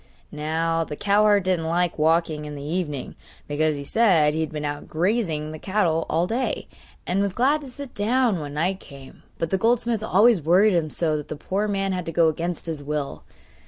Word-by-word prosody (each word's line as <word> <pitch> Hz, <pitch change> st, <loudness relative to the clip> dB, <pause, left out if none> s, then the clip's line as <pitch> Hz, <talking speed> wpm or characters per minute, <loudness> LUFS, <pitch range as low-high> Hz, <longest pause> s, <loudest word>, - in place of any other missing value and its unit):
Now 165 Hz, +2 st, -1 dB
the 150 Hz, -, -6 dB
cowherd 205 Hz, +2 st, +3 dB
didn't 180 Hz, -3 st, 0 dB
like 170 Hz, 0 st, 0 dB
walking 160 Hz, -1 st, +1 dB
in 150 Hz, 0 st, -7 dB
the 140 Hz, -, -7 dB
evening, 150 Hz, -3 st, -3 dB, 0.3 s
because, 155 Hz, +1 st, +1 dB
he 140 Hz, -, -6 dB
said, 165 Hz, -4 st, +3 dB
he 160 Hz, -, -2 dB
had 160 Hz, -1 st, -2 dB
been 150 Hz, -1 st, -4 dB
out 145 Hz, 0 st, -4 dB
grazing 165 Hz, -4 st, -1 dB
the 155 Hz, -, -8 dB
cattle 175 Hz, -5 st, 0 dB
all 165 Hz, +2 st, +2 dB
day, 235 Hz, +7 st, -2 dB, 0.4 s
and 185 Hz, +3 st, 0 dB
was 200 Hz, -2 st, 0 dB
glad 280 Hz, +7 st, +2 dB
to 280 Hz, -, -9 dB
sit 275 Hz, 0 st, -9 dB
down 225 Hz, -1 st, +1 dB
when 145 Hz, -1 st, -6 dB
night 180 Hz, +5 st, 0 dB
came; 135 Hz, -2 st, -13 dB, 0.2 s
but 165 Hz, -, -3 dB
the 190 Hz, -, +1 dB
goldsmith 235 Hz, 0 st, +1 dB
always 215 Hz, -1 st, +4 dB
worried 185 Hz, +7 st, +4 dB
him 165 Hz, -3 st, +1 dB
so 155 Hz, 0 st, 0 dB
that 150 Hz, -, -6 dB
the -, -, -5 dB
poor 195 Hz, +7 st, -2 dB
man 195 Hz, -1 st, -1 dB
had 180 Hz, -2 st, -3 dB
to -, -, -2 dB
go 165 Hz, 0 st, +4 dB
against 170 Hz, +3 st, -3 dB
his 160 Hz, -4 st, -4 dB
will. 145 Hz, -1 st, -3 dB
170 Hz, 205 wpm, -24 LUFS, 155-205 Hz, 0.4 s, always